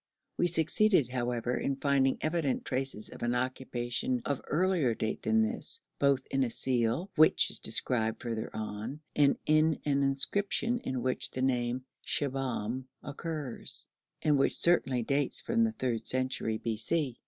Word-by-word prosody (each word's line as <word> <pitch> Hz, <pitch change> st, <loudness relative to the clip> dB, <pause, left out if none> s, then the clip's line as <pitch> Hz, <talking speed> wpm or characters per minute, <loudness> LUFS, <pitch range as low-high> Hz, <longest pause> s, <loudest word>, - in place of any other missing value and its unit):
We 175 Hz, -, +2 dB
succeeded, 170 Hz, -, +3 dB
however, 125 Hz, -1 st, -2 dB
in 140 Hz, -, -1 dB
finding 135 Hz, -1 st, +2 dB
evident 155 Hz, -4 st, -1 dB
traces 130 Hz, -5 st, -2 dB
of -, -, -12 dB
an 120 Hz, +1 st, 0 dB
occupation 130 Hz, -, -2 dB
of 140 Hz, -2 st, -2 dB
earlier 165 Hz, -7 st, +1 dB
date 110 Hz, -, -3 dB
than 110 Hz, 0 st, +2 dB
this, 110 Hz, -, -3 dB, 0.2 s
both 140 Hz, -2 st, +2 dB
in 135 Hz, -, +1 dB
a 125 Hz, -, -1 dB
seal, 125 Hz, -, 0 dB
which 155 Hz, +1 st, +5 dB
is -, -, +3 dB
described 110 Hz, -3 st, +2 dB
further 115 Hz, -2 st, -3 dB
on, 110 Hz, +7 st, -5 dB
and 145 Hz, -2 st, +4 dB
in 155 Hz, +1 st, +3 dB
an 140 Hz, -1 st, +1 dB
inscription 200 Hz, -, +1 dB
in 130 Hz, -, -4 dB
which 130 Hz, 0 st, +1 dB
the 130 Hz, -, -4 dB
name 125 Hz, -1 st, 0 dB, 0.2 s
Shibahm 130 Hz, -3 st, -2 dB, 0.2 s
occurs, 150 Hz, -3 st, -2 dB, 0.4 s
and 150 Hz, -2 st, +3 dB
which -, -, +3 dB
certainly 135 Hz, -8 st, +3 dB
dates 140 Hz, +3 st, 0 dB
from 230 Hz, 0 st, +1 dB
the 225 Hz, -, +1 dB
third 120 Hz, -, -2 dB
century 130 Hz, -4 st, +1 dB
b.c. 120 Hz, +5 st, -2 dB
130 Hz, 150 wpm, -30 LUFS, 120-155 Hz, 0.4 s, which